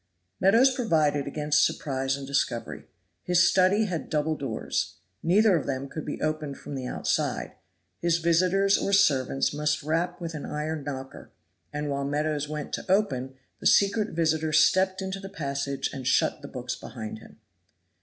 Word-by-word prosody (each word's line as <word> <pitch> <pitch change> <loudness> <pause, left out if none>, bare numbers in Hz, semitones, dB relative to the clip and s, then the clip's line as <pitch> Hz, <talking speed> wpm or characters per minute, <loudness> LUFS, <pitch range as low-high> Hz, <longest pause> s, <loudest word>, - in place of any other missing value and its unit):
Meadows 235 +8 +5
provided 155 - +1
against 150 +1 +2
surprise 135 -1 0
and 140 - -7
discovery. 135 -4 -2 0.4
His 180 0 +4
study 195 +4 +3
had 175 -5 -4
double 155 +1 0
doors. 135 -7 -3 0.3
Neither 200 +3 +4
of 160 - -1
them 135 0 -2
could 155 +2 -7
be 145 - -4
opened 155 -2 -2
from - - -9
the 130 -2 -4
outside. - - -1 0.5
His 170 -1 +2
visitors 185 +4 +3
or 200 - -1
servants 140 -10 +3
must 150 0 0
rap 170 +4 -1
with 170 -2 -5
an 150 - -6
iron 150 0 -3
knocker; 135 -2 -7 0.4
and 150 0 -3
while 140 -1 -2
Meadows 150 +1 -1
went 150 -1 -5
to - - -3
open, 135 -10 +1 0.2
the - - +1
secret 205 0 +3
visitor 160 -1 +1
stepped 190 +4 +3
into 190 +1 -4
the 195 0 -8
passage 140 -6 -3
and 130 -2 -5
shut 130 - +2
the 140 - -8
books 125 -2 -5
behind 110 -3 -7
him. - - -16
155 Hz, 165 wpm, -27 LUFS, 140-185 Hz, 0.5 s, Meadows